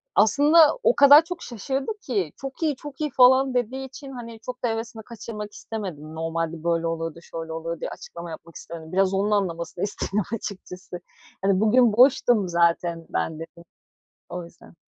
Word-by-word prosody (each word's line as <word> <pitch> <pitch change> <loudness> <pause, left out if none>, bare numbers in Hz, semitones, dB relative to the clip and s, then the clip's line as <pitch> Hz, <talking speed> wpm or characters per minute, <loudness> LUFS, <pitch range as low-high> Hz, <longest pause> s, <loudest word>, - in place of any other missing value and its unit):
aslında 295 - +5
o - - +4
kadar 285 +3 +9
çok 345 0 -7
şaşırdı 265 - -3
ki, 195 - -2
"çok 270 +4 -7
iyi, 300 -3 +1
çok 285 +2 -10
iyi!" 300 - 0
falan 260 +1 +5
dediği 255 +2 -1
için 270 +1 -10
hani 230 -3 -9
çok 250 +2 -8
da - - +2
hevesini 225 0 -4
kaçırmak 210 -2 -8
istemedim. 165 -8 -7
Normalde 165 0 -3
böyle 170 -1 +1
oluyordu, 165 0 -4
şöyle 165 -1 -7
oluyordu 165 0 -4
diye - - -4
açıklama 170 0 -9
yapmak 165 +1 -10
istemedim. 160 -1 -9
Biraz 195 +1 +2
onun 200 +2 +1
anlamasını 175 -4 -1
istedim 205 0 -1
açıkçası. 190 -3 -8 0.4
"Hani 195 -1 +2
bugün 225 +1 +4
boştum 245 -4 +4
zaten 170 -1 +1
ben" 160 - -1
dedim, 170 +1 -10 0.7
o 180 0 -5
yüzden. 170 - -17
210 Hz, 165 wpm, -24 LUFS, 170-255 Hz, 0.7 s, kadar